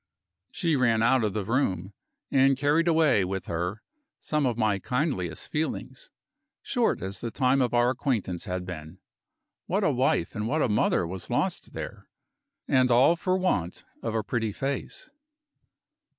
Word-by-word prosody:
She 165 -5 0
ran 115 -4 +3
out 125 0 +4
of 105 -3 0
the 105 -3 -2
room; 100 -6 -1 0.4
and 135 0 +4
carried 150 +4 +2
away 160 - +4
with 95 +1 -3
her 90 +5 -3 0.4
some 150 -3 0
of 120 -2 -1
my 105 -3 +1
kindliest 125 - -2
feelings, 160 - -3 0.5
short 245 - 0
as 95 +1 -5
the 120 - -3
time 130 +2 +2
of 125 - +1
our 120 +1 +4
acquaintance 115 - -2
had 90 0 -3
been. 80 -1 -8 0.7
What - - 0
a - - +3
wife 85 - +1
and 105 -1 -3
what 150 +5 +1
a - - +2
mother 105 -4 +2
was 90 +2 -7
lost - - -1
there - - -7 0.6
and 130 -1 +3
all 125 +7 +5
for 185 +2 0
want 95 - -1 0.2
of 115 - -3
a 110 - 0
pretty 115 -1 -1
face! 135 - -4
120 Hz, 160 wpm, -27 LUFS, 95-140 Hz, 0.7 s, all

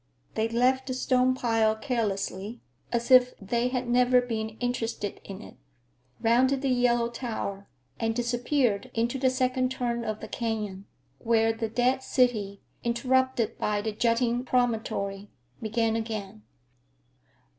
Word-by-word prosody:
They 220 +1 0
left 255 +3 +2
the 255 - -2
stone 255 0 +2
pile 225 -3 +2
carelessly, 220 -2 -2 0.3
as 235 +1 -1
if 250 -1 +6
they 235 +5 -1
had 250 -1 -2
never 250 +1 +4
been 220 -3 -3
interested 230 -4 -3
in 195 +2 -8
it, - - -13 0.6
rounded 260 +4 +3
the 270 - +1
yellow 245 -2 +3
tower, 220 -5 -5 0.3
and 225 0 0
disappeared 245 -1 0
into 235 +3 0
the 260 0 +3
second 255 0 +1
turn 240 -2 -2
of 215 -1 -3
the - - -7
canyon, 210 -4 -3 0.3
where 225 -1 +2
the 225 0 -3
dead 250 +3 +1
city, 215 -7 0 0.2
interrupted 240 -1 +1
by 210 0 0
the 220 - -1
jutting 235 +2 +1
promontory, 220 -5 -1 0.3
began 225 0 0
again. 215 -2 -4
235 Hz, 135 wpm, -27 LUFS, 220-250 Hz, 0.6 s, if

